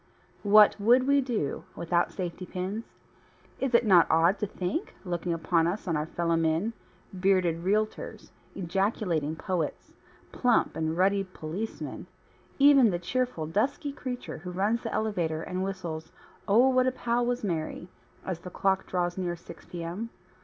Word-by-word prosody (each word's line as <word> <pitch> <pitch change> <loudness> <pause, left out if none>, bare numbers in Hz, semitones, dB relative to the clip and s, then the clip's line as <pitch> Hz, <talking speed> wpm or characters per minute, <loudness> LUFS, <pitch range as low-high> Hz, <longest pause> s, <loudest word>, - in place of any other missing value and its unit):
What 210 0 +6
would 245 +4 +5
we 280 +1 +4
do 230 - -2
without 170 +1 0
safety 180 -1 -5
pins? 190 +5 -4 0.7
Is 265 -3 +1
it 235 - +5
not 180 -5 +6
odd 170 +5 +4
to 210 - -1
think, 195 - -3
looking 175 -1 -2
about 165 0 +2
us 195 +3 -3
on 165 - +1
our 150 +1 -1
fellowmen 165 +4 0 0.4
(bearded 185 -3 +2
realtors, 215 - -1 0.2
ejaculating 180 -4 -1
poets, 170 -2 -3 0.4
plump 245 -2 +2
and 160 0 -1
ruddy 195 +2 +3
policemen, 185 +3 -6 0.5
even 275 -4 +7
the 175 - 0
cheerful 245 -1 -2
dusky 240 - -1
creature 250 - -6
who 180 +3 -7
runs 205 +6 0
the 225 - -4
elevator 170 -7 -1
and 185 +1 -3
whistles 175 -4 -5 0.4
"Oh, 235 +6 +5
What 255 0 +3
a - - +3
Pal 240 -1 0
Was 245 0 -1
Mary" 170 -2 -3 0.4
as 185 -3 -3
the 180 - -8
clock 190 +1 0
draws 175 0 -1
near 175 -2 -1
6 170 - -13
P. 175 -1 -6
M.) 185 +8 -4
185 Hz, 155 wpm, -28 LUFS, 170-225 Hz, 0.7 s, even